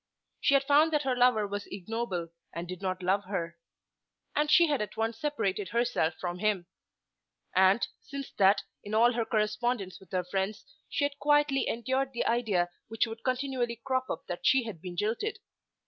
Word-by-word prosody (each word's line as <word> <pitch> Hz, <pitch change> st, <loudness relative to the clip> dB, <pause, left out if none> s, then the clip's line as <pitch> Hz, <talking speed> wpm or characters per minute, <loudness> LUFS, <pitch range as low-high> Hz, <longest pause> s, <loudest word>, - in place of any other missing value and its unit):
She 280 Hz, -, +4 dB
had 275 Hz, -, +4 dB
found 295 Hz, +3 st, +5 dB
that 300 Hz, -1 st, +2 dB
her 260 Hz, -1 st, +1 dB
lover 245 Hz, -4 st, +4 dB
was 205 Hz, 0 st, -4 dB
ignoble, 195 Hz, -3 st, -4 dB, 0.3 s
and 170 Hz, +1 st, -4 dB
did 185 Hz, +1 st, -7 dB
not 185 Hz, -1 st, -2 dB
love 195 Hz, +2 st, +1 dB
her. 170 Hz, -3 st, -4 dB, 0.8 s
And 300 Hz, 0 st, +2 dB
she 340 Hz, +3 st, +7 dB
had 290 Hz, -6 st, 0 dB
at 210 Hz, -, -5 dB
once 225 Hz, 0 st, -1 dB
separated 205 Hz, -10 st, -1 dB
herself 230 Hz, -8 st, +1 dB
from 175 Hz, 0 st, -3 dB
him. 205 Hz, -3 st, +1 dB, 0.9 s
And, 190 Hz, +4 st, +5 dB
since 280 Hz, -1 st, -7 dB
that, 195 Hz, +1 st, +5 dB, 0.2 s
in 210 Hz, +1 st, -4 dB
all 235 Hz, +2 st, +6 dB
her 230 Hz, -1 st, 0 dB
correspondence 215 Hz, -2 st, -1 dB
with 190 Hz, -, -18 dB
her 185 Hz, -1 st, 0 dB
friends 195 Hz, +3 st, -2 dB, 0.2 s
she 285 Hz, -, +1 dB
had 285 Hz, 0 st, -4 dB
quietly 295 Hz, -2 st, +3 dB
endured 260 Hz, +3 st, -1 dB
the 235 Hz, -, -1 dB
idea 205 Hz, -7 st, +1 dB, 0.2 s
which 225 Hz, +1 st, +1 dB
would 225 Hz, 0 st, -8 dB
continually 255 Hz, -2 st, -1 dB
crop 260 Hz, -1 st, 0 dB
up -, -, -4 dB
that 175 Hz, -, -5 dB
she 265 Hz, -3 st, +4 dB
had 210 Hz, -8 st, -7 dB
been 180 Hz, -1 st, -7 dB
jilted. 230 Hz, -, -1 dB
225 Hz, 180 wpm, -30 LUFS, 190-260 Hz, 0.9 s, she